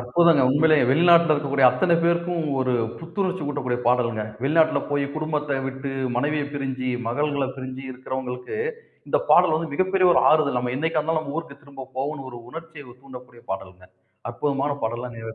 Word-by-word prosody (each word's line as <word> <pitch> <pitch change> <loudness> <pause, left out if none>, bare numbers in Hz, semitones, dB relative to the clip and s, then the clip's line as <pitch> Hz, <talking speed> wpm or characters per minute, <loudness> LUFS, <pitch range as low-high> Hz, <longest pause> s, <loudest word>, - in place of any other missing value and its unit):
அற்புதங்க. 145 +4 +4
உண்மைலே 155 +3 +4
வெளிநாட்டில 170 +2 +5
இருக்கக்கூடிய 140 -2 +2
அத்தனை 175 +5 +2
பேருக்கும் 170 0 0 0.2
ஒரு 130 -1 0 0.3
புத்துணர்ச்சி 185 +2 -3
ஊட்டக்கூடிய 130 -4 -2
பாடல்ங்க. 120 -3 +1 0.2
வெளிநாட்டில 160 +2 +3
போய், 145 -1 +1
குடும்பத்த 150 -2 -2
விட்டு, 135 +1 -5 0.2
மனைவிய 145 +3 0
பிரிஞ்சு, 130 -2 -3 0.2
மகள்களைப் 140 +1 -1
பிரிஞ்சி 130 0 -7
இருக்கறவங்களுக்கு 130 - -5 0.5
இந்தப் - - 0
பாடல் 155 - +6
வந்து 160 -2 -2
மிகப்பெரிய 185 +2 +2
ஒரு - - +4
ஆறுதல். 145 -5 +3
நம்ம 125 0 -2
என்னைக்கா 160 +1 0
இருந்தாலும், 160 +1 0
நம்ம 145 +1 -6
ஊருக்குத் 140 -3 -9
திரும்பப் 135 -2 -11
போவோனு 135 0 -3
ஒரு 120 -1 -9
உணர்ச்சிய 160 -5 -10
தூண்டக்கூடிய 125 -3 -13
பாடல்ங்க. 95 -1 -8 0.5
அற்புதமான 140 0 -1
பாடல்லாம் 120 +1 -4
நேர் 115 0 -7
140 Hz, 155 wpm, -23 LUFS, 130-160 Hz, 0.5 s, பாடல்